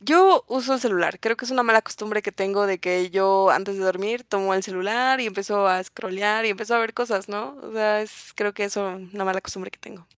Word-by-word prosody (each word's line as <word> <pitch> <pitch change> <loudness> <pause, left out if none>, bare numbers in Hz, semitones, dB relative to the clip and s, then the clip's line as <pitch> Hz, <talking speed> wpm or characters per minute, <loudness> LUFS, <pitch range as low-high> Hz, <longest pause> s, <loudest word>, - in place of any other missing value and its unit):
Yo 360 - +6
uso 260 +1 0
el 260 - -2
celular. 185 -6 0
Creo 225 +1 0
que 255 - -8
es - - -3
una 255 -1 +2
mala 225 -2 +6
costumbre 215 -1 -4
que 205 - -4
tengo 195 +1 0
de 190 -2 -1
que 180 +1 -1
yo 195 0 +4
antes 195 +1 0
de 190 - -2
dormir 200 +6 -1
tomo 195 -3 -1
el 190 - 0
celular 220 +8 0
y 240 - -1
empiezo 200 0 -1
a 185 -1 +2
scrollear, 205 +4 -2
y 220 - +3
empiezo 220 +3 -3
a - - +5
ver 225 0 -1
cosas, 215 -5 -2
¿no? 210 +7 -7
O - - -13
sea, 215 -1 +1
es 215 - -13
creo 205 0 -2
que 205 - -2
eso, 200 0 -3 0.3
una 195 -2 -4
mala 190 0 -1
costumbre 190 -1 -9
que - - -15
tengo. 185 -6 -17
205 Hz, 245 wpm, -23 LUFS, 195-225 Hz, 0.3 s, Yo